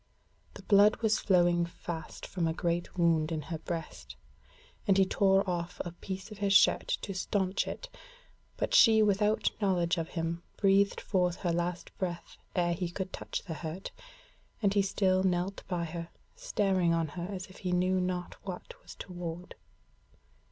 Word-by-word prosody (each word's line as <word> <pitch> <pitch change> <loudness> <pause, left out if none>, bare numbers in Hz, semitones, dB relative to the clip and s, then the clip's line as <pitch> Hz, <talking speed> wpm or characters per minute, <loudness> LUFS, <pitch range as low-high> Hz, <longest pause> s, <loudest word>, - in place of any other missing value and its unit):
The - - -10
blood 205 +1 +6
was 215 -1 +3
flowing 175 -2 +3
fast 170 -1 -6
from 175 -4 -1
a 160 - -1
great 175 +1 -2
wound 165 -2 +3
in 155 -2 -2
her 160 - -3
breast, 65 - -6 0.7
and 195 -1 +4
he 195 - +5
tore 195 +1 +3
off 175 -1 -3
a 175 - -4
piece 190 +4 -7
of 210 - -9
his 200 -1 +2
shirt - - +5 0.2
to 195 - -4
staunch 190 0 0
it, - - -5 0.7
but - - -1
she 220 -2 +7
without 210 +1 +2
knowledge 175 -3 +2
of 165 - -3
him 165 0 -3 0.2
breathed 200 0 +3
forth 180 -3 +1
her 175 -3 0
last 175 +1 -3
breath 175 -3 -4 0.2
ere 175 -2 +2
he 170 0 -2
could 185 +1 -5
touch - - -4
the 170 - -5
hurt, 160 +4 -6 0.7
and 200 -3 +2
he 200 - +4
still 190 -1 +2
knelt 185 +1 0
by 175 -2 -1
her, 170 +1 -6 0.3
staring 195 - +1
on 165 -2 0
her 175 +3 -5
as 185 -2 -5
if 185 - -15
he 180 - -2
knew 185 +1 +2
not 180 -1 -2
what 185 -2 -7
was - - -12
toward. 175 0 -7
180 Hz, 170 wpm, -30 LUFS, 170-195 Hz, 0.7 s, she